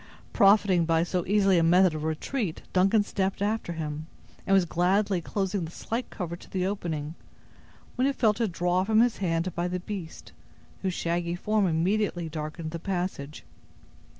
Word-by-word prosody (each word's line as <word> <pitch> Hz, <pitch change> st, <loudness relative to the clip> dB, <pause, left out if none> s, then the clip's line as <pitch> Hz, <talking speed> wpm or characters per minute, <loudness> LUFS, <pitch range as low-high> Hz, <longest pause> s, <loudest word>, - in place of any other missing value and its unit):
Profiting 195 Hz, -3 st, +5 dB
by 165 Hz, 0 st, +2 dB
so 175 Hz, 0 st, -1 dB
easy 195 Hz, -2 st, +4 dB
a -, -, +2 dB
method 180 Hz, +1 st, +5 dB
of 155 Hz, -1 st, -4 dB
retreat, 160 Hz, -, -3 dB
Duncan 195 Hz, +3 st, +4 dB
stepped 195 Hz, -1 st, -2 dB
after 205 Hz, -3 st, -1 dB
him, 155 Hz, -1 st, -5 dB, 0.4 s
and 195 Hz, -, +3 dB
was 190 Hz, -2 st, +4 dB
gladly 185 Hz, +3 st, +1 dB
closing 195 Hz, +1 st, -2 dB
the 160 Hz, -, -5 dB
slight 230 Hz, +7 st, -4 dB
cover 170 Hz, -3 st, -5 dB
to -, -, -15 dB
the 185 Hz, -1 st, -1 dB
opening, 165 Hz, -6 st, -3 dB, 0.8 s
when 255 Hz, +2 st, +3 dB
he 280 Hz, -, +1 dB
felt 220 Hz, -3 st, +1 dB
it 220 Hz, -5 st, +1 dB
drawn 175 Hz, +2 st, +1 dB
from 220 Hz, +2 st, +3 dB
his 240 Hz, -1 st, +2 dB
hand 170 Hz, -1 st, -1 dB
by 175 Hz, +1 st, -1 dB
the 180 Hz, 0 st, -2 dB
beast, 180 Hz, -3 st, -7 dB, 0.5 s
whose 185 Hz, -2 st, -1 dB
shaggy 170 Hz, 0 st, -1 dB
form 210 Hz, +2 st, +1 dB
immediately 175 Hz, +1 st, 0 dB
darkened 155 Hz, +1 st, -5 dB
the 170 Hz, -, -5 dB
passage. 175 Hz, -6 st, -4 dB
180 Hz, 170 wpm, -27 LUFS, 165-200 Hz, 0.8 s, Profiting